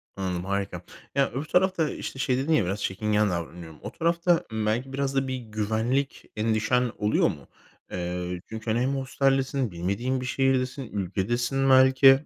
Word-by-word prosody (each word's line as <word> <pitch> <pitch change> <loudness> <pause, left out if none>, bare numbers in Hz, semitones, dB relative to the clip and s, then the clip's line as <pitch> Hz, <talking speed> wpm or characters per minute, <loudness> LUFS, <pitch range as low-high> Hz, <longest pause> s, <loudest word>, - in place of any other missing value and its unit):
Anladım, 90 -2 -3
harika. 100 0 -2 0.3
Ya, 140 0 +2
öbür 135 +5 -3
tarafta, 180 -1 +2
işte 135 - -6
şey 130 -1 +1
dedin 150 +5 +1
ya 105 -11 +3
biraz 100 +3 -2
çekingen 105 +2 +1
davranıyorum. 85 -2 -5
O 105 - -6
tarafta, 170 +2 +2
ımm, 110 -1 -2
belki 125 +5 -1
biraz 140 0 -1
da 135 0 +1
bir 130 - -2
güvenlik 110 +4 -1
endişen 115 +3 +1
oluyor 105 +1 +2
mu? - - -8 0.4
Eee, 90 0 -3
çünkü, 110 0 -4
hani, 115 - +1
hem 135 +2 +1
hosteldesin, 135 -2 +1
bilmediğin 100 +10 -1
bir - - -4
şehirdesin, 130 +1 +1
ülkedesin 120 +8 0
belki. 130 +2 +7
125 Hz, 160 wpm, -26 LUFS, 100-135 Hz, 0.4 s, belki